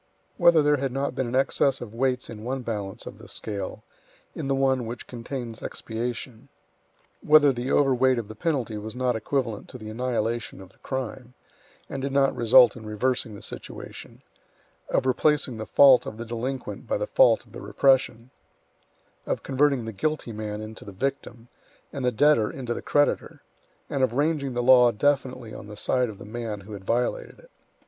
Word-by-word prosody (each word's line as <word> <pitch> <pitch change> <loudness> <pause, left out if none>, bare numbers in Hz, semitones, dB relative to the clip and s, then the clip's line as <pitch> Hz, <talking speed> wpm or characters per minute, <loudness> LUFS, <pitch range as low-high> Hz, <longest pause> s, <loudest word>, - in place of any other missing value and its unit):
Whether 170 -4 +6
there 145 0 +3
had 135 -1 -2
not 135 +1 -2
been 130 -1 -2
an 120 - -3
excess 135 0 +2
of 115 -3 -8
weights 125 +1 0
in 110 -2 -9
one 130 +2 -3
balance 105 -4 -5
of - - -9
the - - -12
scale, 100 -3 -5 0.5
in - - -5
the 135 - +1
one 130 -3 +1
which 120 +2 -7
contains 120 -1 -6
expiation. 120 +2 -5 0.7
Whether 150 -2 +6
the 120 +1 -4
over 135 -2 +4
weight 130 0 +3
of 115 -3 -3
the 110 - -8
penalty 120 -4 -2
was 110 +3 -7
not 125 -1 0
equivalent 115 -1 -2
to - - -9
the 110 -2 -8
annihilation 120 -1 -2
of 95 -1 -12
the - - -30
crime, 125 -1 -5 0.5
and 135 - -5
did 140 +1 -2
not 135 0 +2
result 120 0 +6
in 115 - -10
reversing 110 +1 -1
the - - -11
situation, - - -9 0.7
of - - +1
replacing 130 -1 +1
the 110 - -6
fault 135 -3 +6
of 110 - -6
the 115 - -6
delinquent 120 +3 -5
by - - 0
the - - -2
fault - - +4
of - - -22
the - - -9
repression, 130 -3 +2 1.0
of - - -2
converting 135 -2 +1
the 110 - -5
guilty 155 +2 -2
man 105 -1 -5
into 110 0 -9
the 100 - -9
victim, 120 +1 -4 0.5
and 140 -3 -4
the 125 - +2
debtor 125 -3 +4
into 125 -3 -4
the - - -5
creditor, 145 0 0 0.4
and 140 - -2
of 130 -3 +2
ranging 140 -2 0
the 120 - 0
law 125 -1 +7
definitely 130 -1 0
on 105 - -9
the 105 0 -10
side 125 +2 +1
of 105 - -9
the 100 - -11
man 110 -2 -5
who 105 +2 -11
had 95 -2 -9
violated 120 +3 -1
it. - - -20
125 Hz, 190 wpm, -25 LUFS, 110-135 Hz, 1.0 s, law